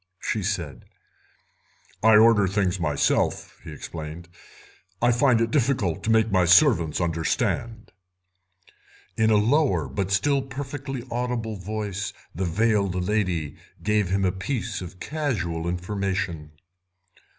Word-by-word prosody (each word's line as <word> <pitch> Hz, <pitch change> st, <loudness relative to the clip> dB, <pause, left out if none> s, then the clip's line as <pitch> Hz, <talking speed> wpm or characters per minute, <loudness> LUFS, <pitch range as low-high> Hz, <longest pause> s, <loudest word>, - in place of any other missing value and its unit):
she 110 Hz, -, -2 dB
said. 85 Hz, -, -4 dB, 1.2 s
"I 110 Hz, 0 st, +6 dB
order 105 Hz, -2 st, +6 dB
the -, -, -4 dB
things 95 Hz, -2 st, 0 dB
myself," 75 Hz, -4 st, 0 dB
he -, -, -9 dB
explained; 80 Hz, +2 st, -8 dB, 0.7 s
"I 120 Hz, +1 st, +3 dB
find 120 Hz, -1 st, +3 dB
it 115 Hz, 0 st, 0 dB
difficult 120 Hz, -, +1 dB
to -, -, -2 dB
make 110 Hz, 0 st, +3 dB
my 95 Hz, -2 st, +3 dB
servants 90 Hz, -, +4 dB
understand." 90 Hz, +7 st, -2 dB, 1.2 s
In 110 Hz, 0 st, +2 dB
a 110 Hz, -, +4 dB
lower, 110 Hz, -, +2 dB
but 90 Hz, +9 st, -3 dB
still 135 Hz, +9 st, +2 dB
perfectly 135 Hz, -1 st, -6 dB
audible, 120 Hz, -2 st, -2 dB
voice 100 Hz, 0 st, -4 dB, 0.2 s
the 95 Hz, +3 st, -2 dB
veiled 100 Hz, +1 st, +1 dB
lady 90 Hz, -6 st, -1 dB, 0.3 s
gave 105 Hz, -3 st, +1 dB
him 95 Hz, +1 st, +1 dB
a 90 Hz, -, +2 dB
piece 110 Hz, +1 st, -4 dB
of 90 Hz, 0 st, -9 dB
casual 90 Hz, -, -2 dB
information. 90 Hz, -4 st, -3 dB
100 Hz, 125 wpm, -25 LUFS, 90-115 Hz, 1.2 s, I